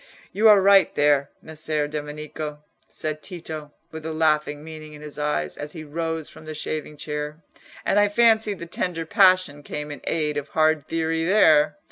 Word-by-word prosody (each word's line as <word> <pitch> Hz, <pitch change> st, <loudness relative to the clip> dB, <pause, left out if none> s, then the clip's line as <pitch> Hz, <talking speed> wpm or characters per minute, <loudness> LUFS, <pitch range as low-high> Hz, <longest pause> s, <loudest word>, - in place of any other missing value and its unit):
"You 220 Hz, +2 st, +5 dB
are 205 Hz, -2 st, +7 dB
right 195 Hz, -1 st, +5 dB
there, 145 Hz, -1 st, +3 dB
Messer 155 Hz, -1 st, -2 dB
Domenico," 150 Hz, 0 st, -6 dB, 0.2 s
said 155 Hz, -1 st, -4 dB
Tito, 160 Hz, -5 st, -7 dB, 0.2 s
with 160 Hz, -1 st, -8 dB
a 160 Hz, -, -4 dB
laughing 150 Hz, -2 st, +1 dB
meaning 155 Hz, -1 st, -10 dB
in 150 Hz, 0 st, -11 dB
his 150 Hz, -1 st, -8 dB
eyes, 150 Hz, 0 st, -1 dB
as 150 Hz, 0 st, -6 dB
he 160 Hz, -, -7 dB
rose 160 Hz, +1 st, -3 dB
from 155 Hz, -, -13 dB
the 155 Hz, 0 st, -6 dB
shaving 150 Hz, 0 st, -4 dB
chair; 150 Hz, +1 st, -5 dB, 0.4 s
"and 205 Hz, -, +3 dB
I 205 Hz, 0 st, +4 dB
fancy 220 Hz, -1 st, +3 dB
the 170 Hz, -, -8 dB
tender 170 Hz, -1 st, -3 dB
passion 185 Hz, -6 st, +4 dB
came 150 Hz, +1 st, -6 dB
in 145 Hz, -, -8 dB
aid 150 Hz, -2 st, -1 dB
of 145 Hz, -, -3 dB
hard 155 Hz, -1 st, +1 dB
theory 165 Hz, 0 st, -1 dB
there. 165 Hz, -, +4 dB
155 Hz, 175 wpm, -24 LUFS, 150-165 Hz, 0.4 s, are